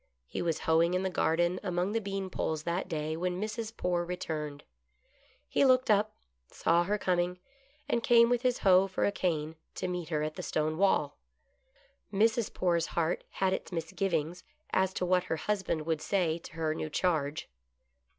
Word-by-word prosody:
He - - -4
was 165 -2 -1
hoeing 165 +2 +3
in 185 - 0
the 190 - -1
garden 175 +2 +1
among 180 0 -1
the 225 +1 0
bean 195 -2 -4
poles 155 -3 -2
that 170 +3 -2
day 155 -2 -2
when 180 +2 -2
Mrs. 220 +2 -4
Poore 175 -1 0
returned. 155 -5 -4 0.8
He - - +2
looked 255 -3 +4
up, 210 +1 +2 0.3
saw 170 +1 +2
her 205 +3 0
coming, 180 -2 0 0.5
and 235 - +1
came 235 0 +6
with 245 0 +1
his 250 -1 +1
hoe 190 0 +6
for 190 - 0
a - - +2
cane 160 -5 -2 0.2
to - - -3
meet 180 -3 -4
her 150 -2 0
at 155 0 -2
the - - -6
stone 155 +1 -1
wall. 155 -7 +2 0.9
Mrs. 225 +2 +2
Poore's 170 -2 +1
heart 165 0 -1
had 190 -1 0
its - - -4
misgivings 165 0 -2 0.3
as 190 0 +2
to 180 - 0
what 180 0 +2
her 160 - -2
husband 185 -4 -1
would 160 -2 -1
say 170 -3 0
to - - -12
her 160 -1 -1
new 155 0 -4
charge. 155 -3 0
180 Hz, 180 wpm, -30 LUFS, 160-195 Hz, 0.9 s, came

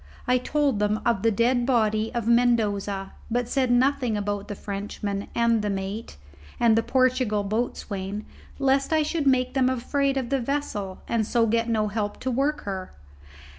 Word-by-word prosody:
I 250 0 +3
told 280 -3 0
them 210 +1 +1
of 235 -5 +2
the 225 - +3
dead 240 +3 +2
body 220 -3 +1
of 235 -2 -2
Mendoza, 210 -5 +1 0.2
but 240 +1 0
said 260 0 +1
nothing 245 -2 +2
about 205 0 -3
the 205 - -5
Frenchman 200 0 -4
and 235 -1 +3
the 210 - -1
mate, 195 - -4 0.4
and 230 -2 +5
the 225 - +3
Portugal 255 -4 +1
boatswain, 205 -2 -3 0.3
lest 275 +1 +2
I 315 -1 +3
should 300 -1 -1
make 255 -1 +2
them 260 -2 +3
afraid 275 +2 0
of 255 -3 -2
the 275 - +1
vessel, 230 -8 -3
and 230 -2 +1
so 235 -1 +3
get 230 +1 +1
no 215 -2 +1
help 205 0 -3
to 260 - -1
work 285 +4 0
her. 190 -2 -5
230 Hz, 170 wpm, -25 LUFS, 205-255 Hz, 0.4 s, and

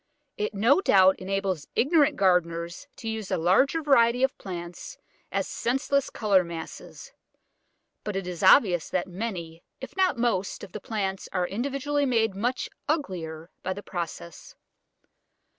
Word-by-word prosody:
It 210 0 -3
no 235 - +4
doubt 190 - +5
enables 190 -4 -2
ignorant 295 +1 +3
gardeners 175 +2 0
to 225 - -8
use 220 -3 -4
a - - 0
larger 260 - +3
variety 245 -3 +4
of 265 - +2
plants 175 -2 -7 0.3
as - - -1
senseless 270 +2 0
colour 200 -4 +2
masses, 170 -1 -9 0.9
but 210 -2 -4
it 195 -1 -2
is 180 -2 -6
obvious 185 - +5
that 180 - -1
many, 175 -4 -5 0.2
if 265 - -9
not 375 -7 +2
most, 230 -6 -1
of 195 - -9
the 215 - -7
plants 195 -3 -3
are 180 -2 0
individually 275 +7 -1
made 225 -4 +2
much 245 +5 -1 0.2
uglier 170 - -3
by 185 - -2
the 205 +2 -9
process. 170 -1 -7
195 Hz, 140 wpm, -26 LUFS, 180-250 Hz, 0.9 s, doubt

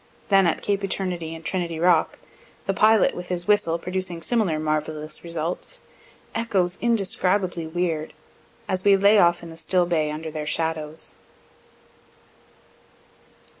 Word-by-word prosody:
Then 195 -2 +5
at 165 - -1
cape 200 -1 0
Eternity 180 -4 -2
and 165 0 -11
Trinity 170 -3 -2
rock, 170 -1 +3 0.5
the 195 - 0
pilot 215 +1 +4
with 180 0 -7
his 175 0 -3
whistle 205 -6 +3
producing 180 -1 -4
similar 215 -10 +1
marvellous 155 0 -3
results, 170 - -4 0.5
echoes 195 -6 0
indescribably 190 -6 +1
weird, 160 -2 -2 0.5
as 185 -1 -1
we 200 -1 +6
lay 200 +2 +5
off 175 -1 +4
in 165 - -8
the 165 - -11
still 180 +1 +1
bay 160 -3 +1
under 155 +1 -5
their 150 -1 -5
shadows. 160 -1 -2
175 Hz, 130 wpm, -24 LUFS, 160-195 Hz, 0.5 s, we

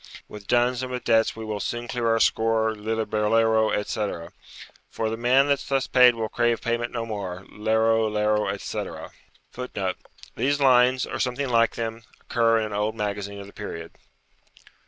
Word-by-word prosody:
With 105 -2 -11
duns 120 +1 +2
and 130 0 -5
with 125 0 -4
debts 115 0 +2
we 110 0 -7
will 105 -1 -3
soon 120 +3 -4
clear 120 -1 -2
our 115 0 +3
score, 110 0 +2
Lillibulero, 110 +1 +1
etc. 105 -5 -3 0.6
For 110 -1 -2
the - - -1
man 125 +4 +3
that's 140 -1 0
thus 135 -1 +1
paid 125 -2 +6
will 110 -1 -2
crave 120 0 +1
payment 120 0 -2
no 115 -1 -3
more, 95 -4 -5
Lero, 110 +1 +2
lero, 105 0 +1
etc. - - -5 0.4
[Footnote: 100 -7 -4 0.4
These 140 +5 0
lines, 130 -1 +4
or - - -5
something 125 +2 -1
like 115 -1 +3
them, 115 0 -4 0.2
occur 115 -1 +2
in 110 - 0
an 105 - -6
old 105 +2 -1
magazine 100 -1 -4
of - - -9
the 100 - -14
period. 85 -5 -7
115 Hz, 170 wpm, -25 LUFS, 105-120 Hz, 0.6 s, paid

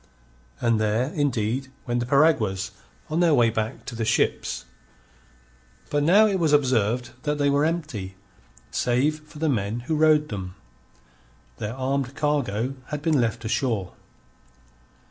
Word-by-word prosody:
And 115 -2 +2
there, 110 +7 0
indeed, 130 -3 0 0.2
went 120 0 0
the 120 - -3
piraguas 115 -9 +2 0.4
on 155 +2 -1
their 170 -4 +4
way 115 -3 +4
back 110 +2 -3
to 125 - -6
the 115 - -2
ships. 110 - 0 1.3
But 145 - +2
now 190 +9 +6
it 200 -3 +1
was 160 -3 +2
observed 125 -3 +2
that 150 0 -1
they 145 -1 +2
were 145 +2 +3
empty, 150 - -3 0.6
save 135 +6 +1
for 150 0 -16
the 160 +1 0
men 115 -3 -1
who 135 +7 -3
rowed 155 -1 +4
them. 95 -3 -6 1.0
Their 105 +3 -4
armed 135 0 -2
cargo 135 -6 0
had 150 -1 -5
been 155 -5 +3
left 115 0 -2
ashore. 110 -5 -1
130 Hz, 145 wpm, -25 LUFS, 115-150 Hz, 1.3 s, now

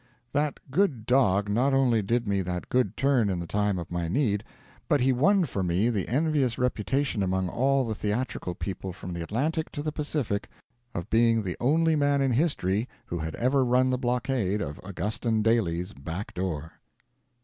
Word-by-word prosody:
That 145 0 0
good 145 - +1
dog 105 -6 +3
not 125 +7 +2
only 125 -5 +3
did 115 +3 0
me 100 -1 +1
that 90 -1 -4
good 125 0 +1
turn 135 -6 +3
in 90 -2 -1
the 85 - -4
time 105 +1 0
of 85 -1 -6
my 85 -1 -2
need, 105 - +1 0.5
but 145 - +4
he 130 +1 +3
won 185 +9 +3
for 100 -8 -3
me 90 +5 +1
the 100 -6 -2
envious 140 -2 +1
reputation 125 0 0
among 95 -1 0
all 135 +3 +2
the 110 - -2
theatrical 105 -4 -2
people 95 0 -5
from 90 0 -7
the 85 - -4
Atlantic 150 - -1
to 145 - -4
the 155 - -1
Pacific 145 -9 -2 0.5
of 85 - -5
being 115 -1 +4
the 90 -3 -3
only 160 +5 +3
man 145 -1 +2
in 135 -1 +2
history 120 - +1 0.2
who 85 - -4
had 80 0 -4
ever 130 +3 +2
run 125 +1 +3
the 130 - +1
blockade 120 -5 0
of 75 -6 -4
Augustin 105 +4 -1
Daly's 90 -6 +1
back 80 +9 -6
door. 80 -4 -4
115 Hz, 180 wpm, -27 LUFS, 95-135 Hz, 0.5 s, but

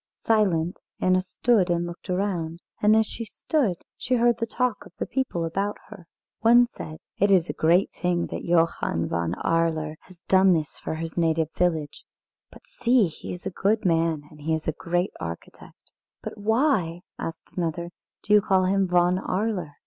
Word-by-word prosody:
Silent, 185 -6 +2 0.2
Anna 185 0 +3
stood 195 0 +1
and 175 0 +1
looked 175 +3 -9
around. 180 -3 -1 0.2
And 210 +1 +5
as 220 0 +4
she 230 - -6
stood 230 - -1 0.2
she 255 - -1
heard 240 -1 +3
the 230 - -1
talk 250 -1 -1
of - - -15
the - - -2
people 250 -11 -2
about 195 +5 -2
her. 180 -4 -12 0.3
One 240 +2 +6
said: 155 -9 -9 0.2
"It 200 - +4
is 180 -4 +4
a - - -3
great 170 +4 +3
thing 175 -2 +1
that - - -4
Johann 165 - +1
von 85 0 -1
Arler 160 -2 0
has 180 -2 -18
done 185 -4 +4
for 150 - -6
his 165 +1 -4
native 160 -1 +1
village. 160 -5 -1 0.5
But - - -16
see, 245 -2 +2
he 165 - -7
is 180 - -8
a - - -2
good 210 +4 0
man, 165 -3 +1
and 150 -1 -15
he 160 +2 0
is 160 - -6
a - - +2
great 175 +4 -1
architect." 85 0 -9 0.3
"But - - -6
why," 215 - +1 0.2
asked 165 - -7
another, 170 0 -2 0.3
"do 210 - +1
you 210 - +7
call 190 -1 +2
him 195 0 +2
Von 180 +1 +3
Arler? 190 -5 -2
180 Hz, 180 wpm, -25 LUFS, 165-210 Hz, 0.5 s, you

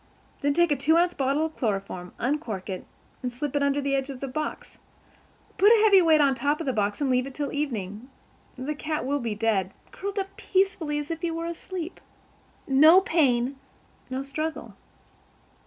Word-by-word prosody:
Then 285 0 +1
take 345 -1 +3
a - - +4
two 305 +5 +3
ounce 350 +1 +3
bottle 275 +2 +1
of 315 - -6
chloroform, 195 -5 -3
uncork 235 - -2
it, 185 - -6 0.3
and 250 -2 -3
slip 275 +3 -4
it 285 - +2
under 280 0 +2
the 280 -1 -1
edge 270 0 0
of 265 -2 -6
the 275 - -4
box. 305 +4 -5 0.8
Put 410 +3 +7
a 445 -2 +6
heavy 400 -3 +7
weight 320 -2 +5
on 280 -2 +4
top 285 +4 0
of 330 - -4
the 265 - 0
box 205 -2 -1
and 285 - +1
leave 255 +1 +1
it 270 - -10
till 290 -1 -3
evening. 235 -5 -4 0.5
The 265 +4 -3
cat 305 -1 -3
will 285 +2 0
be 230 -4 -3
dead, 205 -4 0 0.2
curled 400 +1 -5
up 390 0 -3
peacefully 375 -6 0
as 295 +2 -4
if 325 0 -4
he 345 - -1
were 330 0 -3
asleep. 340 +1 -6 0.7
No 310 +7 +7
pain—no 270 -4 -2
struggle." 310 +3 -4
285 Hz, 190 wpm, -26 LUFS, 255-320 Hz, 0.8 s, Put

